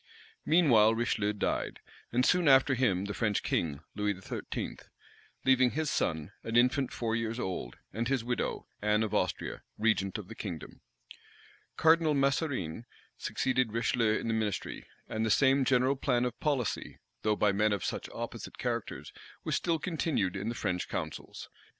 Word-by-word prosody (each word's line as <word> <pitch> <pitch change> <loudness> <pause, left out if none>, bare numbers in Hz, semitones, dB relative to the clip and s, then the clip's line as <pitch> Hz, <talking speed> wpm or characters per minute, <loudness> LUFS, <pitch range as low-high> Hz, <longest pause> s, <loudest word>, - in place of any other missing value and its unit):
Meanwhile 120 -10 +5
Richelieu 110 -3 0
died, 105 - -2 0.3
and 125 +2 +2
soon 180 -3 +3
after 135 0 +6
him 100 -7 +1
the 100 - -3
French 105 -2 0
king, 75 -3 -1
Louis 105 -2 -1
XIII., 95 - -5 0.7
leaving 130 -1 +5
his 155 +3 -1
son, 80 +1 -1
an 115 - -4
infant 125 +2 +3
four 115 -1 -1
years 115 +1 -2
old, 90 - -4 0.2
and 115 +3 -1
his 130 -3 0
widow, 125 +1 -2 0.2
Anne 105 +1 +2
of 110 -1 -3
Austria, 90 -4 -1 0.2
regent 105 -2 +1
of 105 -4 -8
the 115 - -8
kingdom. 90 -8 -7 1.0
Cardinal 160 -1 +4
Mazarine 135 - 0 0.3
succeeded 130 -4 0
Richelieu 115 -1 +2
in - - -4
the 115 - +1
ministry; 110 -4 -2 0.2
and 110 - -2
the 110 - +1
same 135 +4 +4
general 130 +1 +3
plan 125 -2 +1
of 120 -1 -4
policy, 140 -7 -1 0.2
though 110 0 +2
by 105 0 +3
men 105 +2 +2
of 100 -3 -1
such - - -3
opposite - - -6
characters, - - -3 0.3
was - - -2
still 170 -2 +1
continued 155 - -1
in 100 +3 -2
the 120 - -3
French 90 -5 -2
councils. - - -5
115 Hz, 160 wpm, -31 LUFS, 105-130 Hz, 1.0 s, after